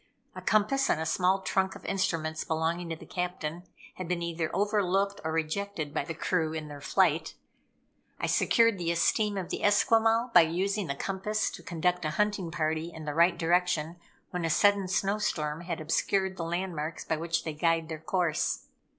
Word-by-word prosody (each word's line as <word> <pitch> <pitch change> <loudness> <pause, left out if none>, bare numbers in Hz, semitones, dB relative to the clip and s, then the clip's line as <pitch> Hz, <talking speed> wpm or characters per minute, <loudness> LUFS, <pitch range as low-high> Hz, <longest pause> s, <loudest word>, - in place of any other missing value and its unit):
A - - -7
compass 250 +6 +2
and - - +2
a 160 - -2
small 185 +3 +2
trunk 190 0 0
of - - -12
instruments 160 -5 -1
belonging 165 +2 -1
to 165 - -2
the - - -13
Captain 175 -2 -3 0.4
had 185 - -5
been 175 -1 -1
either 165 -1 -2
over 205 +1 +1
looked 195 +2 0
or 160 - -2
rejected 160 0 -2
by - - 0
the 165 - -6
crew 160 -1 0
in 155 -1 -5
their 145 -1 -9
flight. 160 -2 +1 0.8
I - - -1
secured 230 -4 +3
the 170 -1 -1
esteem 205 +4 +1
of 185 -3 -4
the - - -3
Esquimaux 225 +2 +3
by 175 - +9
using 190 +4 0
the 140 - -2
compass 200 +6 -1
to - - -9
conduct 180 0 -1
a 155 - 0
hunting 210 -4 0
party 160 +1 -1
in 160 -2 -9
the 150 - -3
right 170 +3 +4
direction 175 -1 +1 0.3
when 180 -2 -3
a 165 - 0
sudden 200 +3 +3
snow 195 +2 0
storm 155 -7 -1
had 170 -2 -3
obscured 190 +4 0
the 170 - -4
landmarks 170 -2 -3
by 160 - 0
which 165 +1 -1
they 160 - -4
guide 165 +1 +1
their 160 -1 -5
course. 170 -1 -1
175 Hz, 190 wpm, -29 LUFS, 160-195 Hz, 0.8 s, by